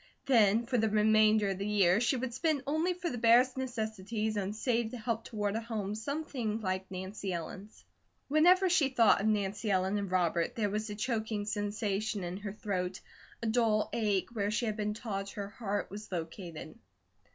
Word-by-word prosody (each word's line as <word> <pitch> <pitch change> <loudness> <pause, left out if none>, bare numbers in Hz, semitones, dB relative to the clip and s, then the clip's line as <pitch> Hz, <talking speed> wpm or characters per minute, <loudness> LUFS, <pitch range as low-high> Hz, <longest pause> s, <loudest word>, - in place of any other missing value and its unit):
Then 225 -3 +4
for 250 0 0
the 220 0 +2
remainder 215 0 +4
of 190 - -4
the 200 - -2
year 200 -1 +3
she 245 +3 +2
would 245 -1 -3
spend 310 -1 0
only 315 +5 +1
for 355 0 -4
the 245 - -4
barest 240 +3 +5
necessities 220 -4 -3
and 200 0 -2
save 235 0 0
to 245 - -7
help 230 0 -3
toward 205 -2 -2
a 225 - -1
home 215 -3 -3
something 240 -2 -3
like 190 -2 -3
Nancy 190 +1 -5
Ellen's. 185 +5 -7 0.4
Whenever 355 +6 +5
she 335 -6 +3
thought 230 -6 +4
of 210 - 0
Nancy 210 0 0
Ellen 190 +1 +1
and 200 -2 -3
Robert 175 -2 +1
there 210 -3 0
was 215 +1 -2
a 205 - -4
choking 220 -2 -2
sensation 205 -1 -2
in 175 +1 -4
her 205 0 -5
throat, 190 -2 -3 0.4
a - - -1
dull 220 -2 +2
ache 205 -4 0
where 205 -3 0
she 220 +3 0
had 215 -2 -1
been 210 -1 -2
taught 200 -3 -4
her 200 -1 -5
heart 205 -3 -3
was 210 +1 -8
located. 165 -2 -6
215 Hz, 185 wpm, -31 LUFS, 200-230 Hz, 0.4 s, barest